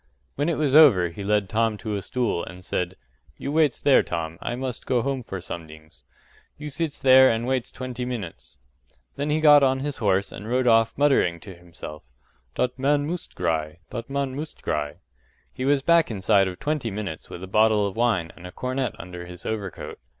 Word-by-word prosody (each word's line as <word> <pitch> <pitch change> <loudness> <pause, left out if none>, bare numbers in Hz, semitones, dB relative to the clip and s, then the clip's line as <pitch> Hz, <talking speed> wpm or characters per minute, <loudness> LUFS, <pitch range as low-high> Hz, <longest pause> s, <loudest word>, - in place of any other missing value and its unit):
When 145 +4 -1
it 165 - 0
was 145 -3 +1
over 125 - +7
he 100 +4 -8
led 105 0 +1
Tom 110 +1 0
to 110 0 -5
a 100 - -3
stool 120 -4 -1
and 90 +1 -10
said, 90 0 -2 0.4
“You 140 - -4
waits 150 -4 +2
there, 140 - +5
Tom. 85 -1 -4
I 120 - -3
must 125 -1 -5
go 125 -3 +1
home 135 -1 -2
for 95 -5 -6
somedings. 80 -2 -10 0.6
You 150 0 -6
sits 155 +1 -3
there 130 0 +7
still - - +2
and 115 +1 -3
waits 130 -1 -1
twenty 125 0 -5
minutes;” 110 - -6 0.6
then 145 +1 -2
he 150 +1 +2
got 150 -2 +7
on 135 -1 +2
his 145 0 -4
horse 100 -3 +1
and 105 +2 -8
rode 125 +1 +1
off 115 -1 +3
muttering 135 -12 +3
to 100 - -10
himself; 85 -3 -10 0.5
“Dot 125 +1 -1
man 145 +2 +2
moost 170 +2 -5
gry, 80 -2 -1
dot 115 +2 -6
man 140 -1 -2
moost 150 +2 -7
gry.” 75 0 -2 0.6
He 130 - -4
was 140 -1 +2
back 170 +1 +4
inside 100 -2 +2
of 90 -1 -6
twenty 145 -4 -1
minutes 100 -6 -6
with 90 - -8
a - - -6
bottle 105 +1 +3
of 100 - -4
wine 110 -8 +1
and 90 - -10
a - - -10
cornet 130 0 -3
under 90 0 -8
his 90 0 -10
overcoat. 105 -4 -5
115 Hz, 200 wpm, -24 LUFS, 90-135 Hz, 0.6 s, over